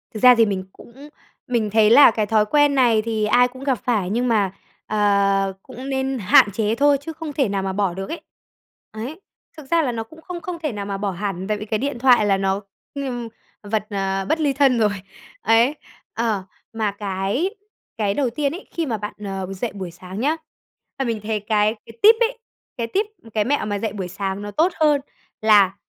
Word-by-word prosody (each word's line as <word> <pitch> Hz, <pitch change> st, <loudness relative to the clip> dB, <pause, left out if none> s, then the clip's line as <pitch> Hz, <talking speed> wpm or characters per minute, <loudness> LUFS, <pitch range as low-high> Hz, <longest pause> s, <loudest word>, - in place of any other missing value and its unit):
Thực 215 Hz, -, -7 dB
ra 250 Hz, -1 st, +9 dB
thì 230 Hz, -1 st, +5 dB
mình 195 Hz, -3 st, -2 dB
cũng 275 Hz, +5 st, -14 dB, 0.4 s
mình 235 Hz, -4 st, 0 dB
thấy 215 Hz, 0 st, +4 dB
là 275 Hz, +2 st, +8 dB
cái 215 Hz, -1 st, -1 dB
thói 215 Hz, 0 st, +2 dB
quen 290 Hz, +4 st, +3 dB
này 240 Hz, -5 st, +4 dB
thì 220 Hz, -1 st, -1 dB
ai 245 Hz, +4 st, +4 dB
cũng 255 Hz, +2 st, -12 dB
gặp 265 Hz, -5 st, 0 dB
phải, 215 Hz, -7 st, 0 dB
nhưng 240 Hz, +5 st, 0 dB
mà, 210 Hz, -5 st, +2 dB, 0.4 s
ờ, 200 Hz, -2 st, +2 dB
cũng 260 Hz, +3 st, -8 dB
nên 265 Hz, 0 st, -1 dB
hạn 205 Hz, 0 st, +5 dB
chế 220 Hz, +1 st, 0 dB
thôi, 285 Hz, +3 st, +4 dB
chứ 320 Hz, +3 st, -7 dB
không 315 Hz, -2 st, -7 dB
thể 270 Hz, -6 st, +1 dB
nào 195 Hz, -1 st, -1 dB
mà 190 Hz, 0 st, -2 dB
bỏ 195 Hz, -2 st, 0 dB
được 195 Hz, +2 st, -6 dB
ấy. 335 Hz, -, -5 dB, 0.7 s
Ấy, 245 Hz, -, -7 dB, 0.4 s
thực 305 Hz, -, -10 dB
ra 335 Hz, -1 st, +4 dB
là 270 Hz, -5 st, 0 dB
nó 225 Hz, -1 st, -3 dB
cũng 315 Hz, +8 st, -16 dB
không 350 Hz, +1 st, -7 dB
không 350 Hz, -1 st, -5 dB
thể 300 Hz, -, 0 dB
nào 205 Hz, -2 st, -5 dB
mà 200 Hz, -1 st, -3 dB
bỏ 200 Hz, 0 st, -2 dB
hẳn, 190 Hz, 0 st, -4 dB
tại 210 Hz, 0 st, 0 dB
vì 210 Hz, -, -6 dB
cái 215 Hz, 0 st, -1 dB
điện 275 Hz, -2 st, -3 dB
thoại 245 Hz, -4 st, +5 dB
là 195 Hz, -1 st, +3 dB
nó, 195 Hz, +1 st, 0 dB, 0.3 s
ừm, 255 Hz, -4 st, -4 dB, 0.4 s
vật, 210 Hz, 0 st, -2 dB
ờ, 195 Hz, -1 st, -1 dB
bất 320 Hz, -, +1 dB
ly 290 Hz, -3 st, +1 dB
thân 270 Hz, -2 st, +3 dB
rồi. 215 Hz, -2 st, +4 dB, 0.5 s
Ấy, 230 Hz, +6 st, +3 dB, 0.4 s
ờ, 220 Hz, -4 st, -1 dB, 0.3 s
mà 220 Hz, -2 st, -1 dB
cái 200 Hz, -, -2 dB, 0.5 s
cái 205 Hz, -3 st, 0 dB
đầu 265 Hz, +2 st, 0 dB
tiên 280 Hz, +4 st, -1 dB
ấy, 360 Hz, +6 st, -8 dB
khi 335 Hz, -, -2 dB
mà 235 Hz, -6 st, -2 dB
bạn, 210 Hz, 0 st, -6 dB
ờ, 195 Hz, -1 st, -4 dB
dậy 215 Hz, +5 st, -3 dB
buổi 190 Hz, -4 st, -6 dB
sáng 185 Hz, +3 st, -9 dB
nhá, 295 Hz, +6 st, +1 dB, 0.6 s
và 270 Hz, -, 0 dB
mình 230 Hz, -2 st, -2 dB
thấy 215 Hz, 0 st, -1 dB
cái 210 Hz, +1 st, +1 dB
cái 230 Hz, -, -14 dB
tip 440 Hz, +2 st, +8 dB
ấy, 475 Hz, +1 st, +1 dB, 0.4 s
cái 230 Hz, -1 st, -2 dB
tip, 395 Hz, -, 0 dB, 0.3 s
cái 215 Hz, -, +2 dB
mẹo 280 Hz, +3 st, 0 dB
mà 205 Hz, -1 st, -2 dB
dậy 215 Hz, -1 st, -3 dB
buổi 190 Hz, -4 st, -4 dB
sáng 195 Hz, +1 st, -4 dB
nó 205 Hz, 0 st, -6 dB
tốt 325 Hz, -, +2 dB
hơn 300 Hz, -3 st, +4 dB, 0.4 s
là, 205 Hz, -3 st, +5 dB
220 Hz, 220 wpm, -22 LUFS, 200-270 Hz, 0.7 s, ra